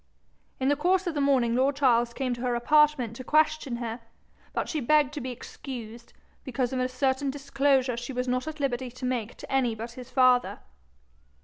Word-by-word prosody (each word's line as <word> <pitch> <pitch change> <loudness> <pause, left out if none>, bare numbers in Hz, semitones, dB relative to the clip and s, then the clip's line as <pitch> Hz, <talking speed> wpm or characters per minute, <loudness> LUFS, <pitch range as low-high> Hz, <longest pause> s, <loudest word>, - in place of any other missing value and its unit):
In 265 +1 +1
the 290 - +3
course 360 +6 +1
of 345 - -1
the 290 - -1
morning 260 -4 +3
lord 265 +3 +2
Charles 240 -4 +3
came 255 0 -2
to 240 - -6
her 250 -1 0
apartment 280 -2 +3
to 255 - -7
question 305 -2 +2
her, 235 0 -5 0.5
but - - -2
she 315 - -2
begged 295 +1 +3
to 295 - -4
be 255 - -4
excused, 240 -2 -8 0.3
because 255 -1 -2
of 260 - -1
a 255 - +1
certain 265 +2 0
disclosure 275 -2 +1
she 240 +3 -6
was 250 0 -2
not 255 +3 -1
at 315 0 -6
liberty 260 -2 -1
to 255 +1 -8
make 245 -3 -2
to - - -10
any 255 -4 +1
but 230 +2 -6
his 250 +1 -10
father. 255 -1 +3
255 Hz, 200 wpm, -27 LUFS, 240-280 Hz, 0.5 s, the